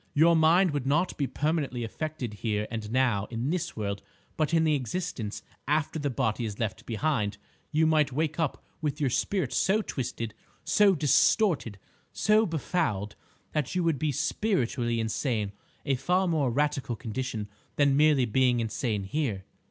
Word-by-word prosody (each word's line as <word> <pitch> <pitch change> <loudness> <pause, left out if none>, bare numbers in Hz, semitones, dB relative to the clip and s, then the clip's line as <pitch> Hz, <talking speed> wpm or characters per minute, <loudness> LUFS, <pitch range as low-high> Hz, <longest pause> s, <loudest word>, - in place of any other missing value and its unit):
Your 165 +3 +6
mind 165 +3 +5
would 145 -3 -2
not 165 +6 +1
be 140 - -1
permanently 145 -6 -1
affected 135 0 -4
here 105 -2 -1
and 110 -2 -4
now, 120 -6 +2
in 120 +5 -2
this 175 -1 -2
world; 100 -2 -3 0.3
but 155 -1 0
in 165 -1 +3
the 155 -1 +3
existence 130 - -3 0.2
after 150 +2 0
the 145 -1 -1
body 115 -1 -1
is 105 -3 -4
left 110 -2 -4
behind, 115 -4 0 0.3
you 155 +1 +3
might 155 -3 +3
wake 155 +3 -1
up 160 -4 -1 0.2
with 150 -1 -2
your 140 -4 +1
spirit 145 - 0
so 210 +3 +2
twisted, 115 - -4 0.3
so 205 -2 +4
distorted, 150 - +3 0.3
so 215 +1 +3
befouled, 120 - -1 0.4
that 150 +1 -2
you 180 - +1
would 165 -5 +1
be 155 0 +1
spiritually 130 - 0
insane—a 110 +2 -3
far 180 +8 +1
more 155 -6 +1
radical 135 -1 0
condition 110 -1 -4 0.3
than 140 -2 +3
merely 150 -3 +4
being 125 +1 +2
insane 110 -2 -1
here." 105 -3 -2
140 Hz, 155 wpm, -28 LUFS, 115-160 Hz, 0.4 s, Your